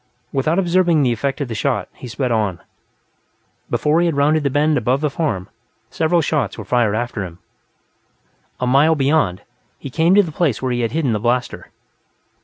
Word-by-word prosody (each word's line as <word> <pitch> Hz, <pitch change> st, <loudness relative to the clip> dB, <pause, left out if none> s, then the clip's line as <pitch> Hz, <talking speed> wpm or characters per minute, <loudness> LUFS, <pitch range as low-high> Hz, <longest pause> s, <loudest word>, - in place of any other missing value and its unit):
Without 155 Hz, +5 st, +1 dB
observing 175 Hz, -4 st, +2 dB
the 125 Hz, -, +2 dB
effect 135 Hz, +5 st, -3 dB
of 140 Hz, -, -2 dB
the 115 Hz, -, -5 dB
shot, 115 Hz, -3 st, -1 dB
he 125 Hz, -, -10 dB
sped 125 Hz, +2 st, -2 dB
on; 105 Hz, -6 st, 0 dB, 1.1 s
before 150 Hz, +2 st, +1 dB
he 175 Hz, -, +2 dB
had 160 Hz, -4 st, -1 dB
rounded 150 Hz, +2 st, +3 dB
the 140 Hz, -, 0 dB
bend 150 Hz, +3 st, +2 dB
above 125 Hz, +1 st, +1 dB
the 150 Hz, -1 st, -1 dB
farm, 125 Hz, -, -2 dB, 0.4 s
several 165 Hz, +1 st, +1 dB
shots 150 Hz, -1 st, -1 dB
were 105 Hz, -, -7 dB
fired 110 Hz, -1 st, +1 dB
after 120 Hz, -3 st, -3 dB
him. 85 Hz, -2 st, -9 dB, 1.2 s
A 125 Hz, -, -1 dB
mile 140 Hz, +6 st, +4 dB
beyond, 135 Hz, -, +1 dB, 0.3 s
he 140 Hz, -, -8 dB
came 165 Hz, +6 st, +3 dB
to 205 Hz, -, +6 dB
the 165 Hz, -, -6 dB
place 150 Hz, -7 st, 0 dB
where 130 Hz, -1 st, -2 dB
he 120 Hz, 0 st, -1 dB
had 115 Hz, -, -1 dB
hidden 150 Hz, -7 st, 0 dB
the 105 Hz, -, -1 dB
blaster. 120 Hz, +3 st, -2 dB
135 Hz, 190 wpm, -19 LUFS, 120-155 Hz, 1.2 s, to